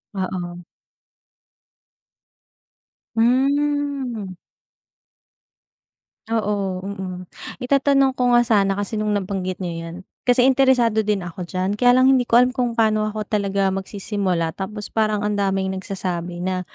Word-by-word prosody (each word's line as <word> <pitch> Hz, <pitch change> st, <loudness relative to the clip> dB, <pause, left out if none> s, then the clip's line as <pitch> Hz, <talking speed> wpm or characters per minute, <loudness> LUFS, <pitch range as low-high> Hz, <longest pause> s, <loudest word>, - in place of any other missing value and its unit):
Oo. 180 Hz, -2 st, -4 dB, 2.5 s
Hmm. 270 Hz, -2 st, +1 dB, 2.0 s
Oo, 200 Hz, -4 st, -1 dB
mm. 190 Hz, -2 st, -6 dB, 0.3 s
Itatanong 275 Hz, +1 st, +2 dB
ko 250 Hz, -1 st, +1 dB
nga 240 Hz, 0 st, +5 dB
sana, 200 Hz, -4 st, +2 dB
kasi 205 Hz, +1 st, -3 dB
nung 215 Hz, -1 st, -1 dB
nabanggit 190 Hz, -2 st, -2 dB
niyo 165 Hz, -2 st, -5 dB
'yan, 165 Hz, -, -8 dB, 0.3 s
kasi 245 Hz, 0 st, +4 dB
interesado 255 Hz, -4 st, +4 dB
din 205 Hz, -3 st, -1 dB
ako 175 Hz, +1 st, -7 dB
diyan. 185 Hz, +1 st, -1 dB
Kaya 245 Hz, +4 st, +4 dB
lang 260 Hz, +1 st, +5 dB
hindi 250 Hz, -2 st, +1 dB
ko 235 Hz, -, +6 dB
alam 250 Hz, +1 st, +4 dB
kung 245 Hz, -3 st, -1 dB
pa'no 215 Hz, -1 st, +2 dB
ako 215 Hz, 0 st, -4 dB, 0.5 s
magsisimula 190 Hz, -3 st, -2 dB
tapos 205 Hz, +2 st, -6 dB
parang 215 Hz, -2 st, +1 dB
ang 210 Hz, -, 0 dB
daming 195 Hz, -1 st, 0 dB
nagsasabi 180 Hz, -2 st, -4 dB
na 185 Hz, -1 st, -1 dB
210 Hz, 120 wpm, -21 LUFS, 190-245 Hz, 2.5 s, ko